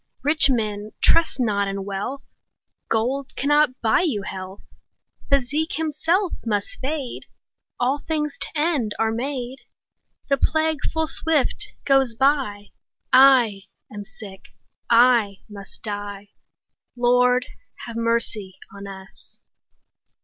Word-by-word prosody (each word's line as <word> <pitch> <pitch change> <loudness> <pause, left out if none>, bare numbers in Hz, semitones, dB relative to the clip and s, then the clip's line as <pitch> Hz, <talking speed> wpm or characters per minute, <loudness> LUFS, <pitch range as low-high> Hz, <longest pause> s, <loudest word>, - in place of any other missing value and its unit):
Rich 300 +1 +5
men, 215 -4 -2
trust 330 -4 +3
not 205 -4 +1
in 195 0 -4
wealth, 205 +8 -4 0.7
Gold 255 +5 -1
cannot 295 -2 +2
buy 220 +5 +3
you 260 - -1
health; 190 0 -7 0.7
Physic 280 +4 +1
himself 320 +5 0
must 205 -3 -2
fade; 275 -2 -4
10 - - -44 0.5
All 265 +4 +1
things 300 -1 -3
to - - 0
end 295 -9 0
are 225 0 +1
made; 255 +1 -4 0.7
The 275 - +2
plague 315 +1 +1
full 320 0 0
swift 315 -2 +1 0.2
goes 270 -4 +3
by; 260 -6 0 0.4
I 250 -7 +6 0.3
am 205 0 -6
sick, 195 -2 -10 0.4
I 230 -4 +4
must 200 -2 -10
die— 205 -1 -6 0.7
Lord, 250 +1 +3 0.4
have 235 - -8
mercy 230 -4 -1 0.2
on 200 0 -8
us! 190 -1 -11
245 Hz, 115 wpm, -23 LUFS, 205-280 Hz, 0.7 s, I